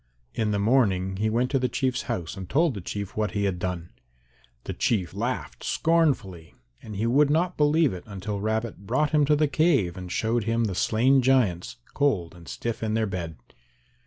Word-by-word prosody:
In 110 -2 -1
the 105 - 0
morning 100 -4 +2
he 110 +2 0
went 120 +3 0
to 135 - +2
the 125 0 0
Chief's 130 -2 -1
house 85 -1 -3
and 95 -2 -8
told 160 +1 +2
the 100 - -6
Chief 100 +2 -5
what 110 0 -1
he 100 -1 -1
had 95 -3 -1
done. 90 -2 -4 0.7
The - - -5
Chief 95 -8 0
laughed - - -4
scornfully 130 - 0 0.3
and 110 -2 -8
he 105 +4 -1
would 140 +5 +4
not 175 +4 +1
believe 150 - +3
it 90 -1 -8
until 100 0 -5
Rabbit 110 -2 -3
brought 150 +7 +1
him 150 -2 +4
to 150 +1 +3
the 150 0 +2
cave 140 - +2
and 90 -1 -7
showed 115 +1 0
him 115 +1 +1
the 105 -4 -1
slain 125 +8 +3
giants 125 -7 +1 0.2
cold 105 - 0
and 85 -1 -15
stiff 115 -1 -4
in 110 -1 -1
their 110 0 +1
bed. 90 -5 -4
110 Hz, 195 wpm, -26 LUFS, 95-135 Hz, 0.7 s, would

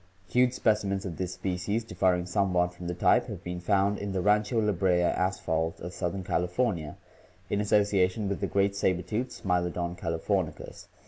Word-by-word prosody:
Huge 125 +4 +3
specimens 100 -5 +1
of 85 -4 -5
this 90 -1 -3
species, 95 +4 -2
differing 90 -5 +1
somewhat 90 -1 +1
from 90 0 -8
the 90 - -3
type, 90 - +3
have - - -7
been 90 0 -4
found 100 +2 +1
in 100 -1 -4
the 95 - 0
Rancho 105 +3 +2
La 105 -1 +2
Brea 90 -2 +2
asphalt 85 -3 0
of 90 +2 -7
southern 90 +1 -3
Cali 90 0 0
fornia 90 -6 -1 0.6
in 100 - +1
association 100 -1 +2
with 100 - -2
the 100 - 0
great 100 0 +1
saber 95 -2 +1
tooth 110 +8 -2
SmUodon 90 -3 -1
calif 80 -2 -4
orni 95 -6 0
ens. - - -10
95 Hz, 185 wpm, -28 LUFS, 90-100 Hz, 0.6 s, Huge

